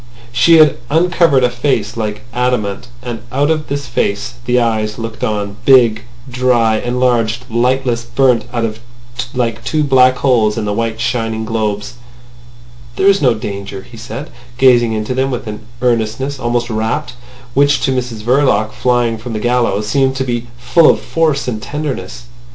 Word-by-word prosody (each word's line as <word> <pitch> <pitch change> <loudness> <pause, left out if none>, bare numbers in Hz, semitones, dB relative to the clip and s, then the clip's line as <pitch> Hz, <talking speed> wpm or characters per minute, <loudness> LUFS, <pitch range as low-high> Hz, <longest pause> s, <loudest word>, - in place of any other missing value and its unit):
She 165 +7 +5
had 155 -3 +5
uncovered 165 -3 +3
a 125 - +4
face 120 -5 -1
like 105 -2 -4
adamant. 125 -3 -1 0.2
And 120 -3 -5
out 145 +4 +1
of 155 -1 -1
this 140 0 -3
face 105 -1 -2
the 125 0 +2
eyes 110 -2 -1
looked 115 -1 -6
on, 105 -1 -2
big, 120 -4 +4 0.2
dry, 125 -3 +2
enlarged, 120 -1 0
lightless, 120 0 +1
burnt 120 0 +2
out 115 -3 -2 0.6
like 115 -3 -1
two 155 -1 0
black 130 -2 +4
holes 115 -6 +2
in 110 - -2
the 105 - -1
white, 115 0 -2
shining 115 -1 -2
globes. 105 -2 -2 1.0
"There 190 - 0
is 200 0 +5
no 125 -5 +3
danger," 100 -2 -6
he 120 - -15
said, 115 +6 -7 0.3
gazing 120 -3 +4
into 110 +3 -2
them 130 +1 0
with 125 -2 -4
an 110 0 -8 0.2
earnestness 125 +3 0
almost 120 -1 -1
rapt, 110 +5 -2 0.4
which 140 +1 +3
to - - +1
Mrs 120 -4 -4
Verloc, 120 -4 +2
flying 120 -2 0
from 115 +1 -6
the 110 - -2
gallows, 120 -3 0
seemed 135 +2 +1
to 135 - -1
be 120 -2 -3
full 125 +7 +4
of - - +3
force 155 -5 0
and 110 -4 -3
tenderness. 145 0 -5
120 Hz, 160 wpm, -15 LUFS, 110-130 Hz, 1.0 s, She